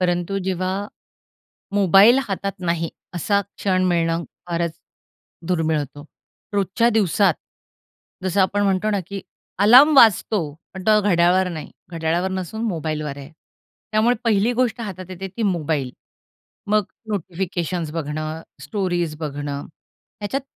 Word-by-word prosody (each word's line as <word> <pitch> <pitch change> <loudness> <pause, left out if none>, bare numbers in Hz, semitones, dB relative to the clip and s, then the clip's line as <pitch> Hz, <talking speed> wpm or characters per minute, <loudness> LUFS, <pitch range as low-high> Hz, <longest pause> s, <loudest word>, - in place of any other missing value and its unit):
परंतु 175 +2 0
जेव्हा 190 +2 -2 0.9
मोबाईल 200 +5 +6
हातात 195 0 -2
नाही, 170 -2 -1 0.2
असा 200 +4 +1
क्षण 185 -1 -1
मिळणं 170 -1 +1 0.2
फारच 170 -1 -1 0.8
दुर्मिळ 160 -3 +1
होतो. 145 +1 -6 0.5
रोजच्या 200 +4 +2
दिवसात 200 -4 +3 0.9
जसं 190 +1 +1
आपण 205 +2 +2
म्हणतो 195 +2 +1
ना 205 - 0
की 195 0 -5 0.4
अलार्म 255 +9 +7
वाजतो, 200 - +4 0.2
पण 190 - -6
तो 215 -1 +5
घड्याळावर 180 -1 +3
नाही. 155 -4 -6 0.2
घड्याळावर 165 +3 0
नसून 190 +4 -4
मोबाईलवर 155 -4 -3
आहे. 140 +1 -10 0.6
त्यामुळे 230 +3 +3
पहिली 220 +1 +3
गोष्ट 240 -2 0
हातात 190 -5 -6
येते 190 +1 -6
ती 230 - -2
मोबाईल. 155 -9 0 0.8
मग 210 0 +2 0.2
नोटिफिकेशन्स 175 -4 -3
बघणं, 155 0 -4 0.2
स्टोरीज 175 -6 -2
बघणं 145 -2 -4 0.6
ह्याच्यात 235 +7 -2
185 Hz, 120 wpm, -22 LUFS, 165-205 Hz, 0.9 s, अलार्म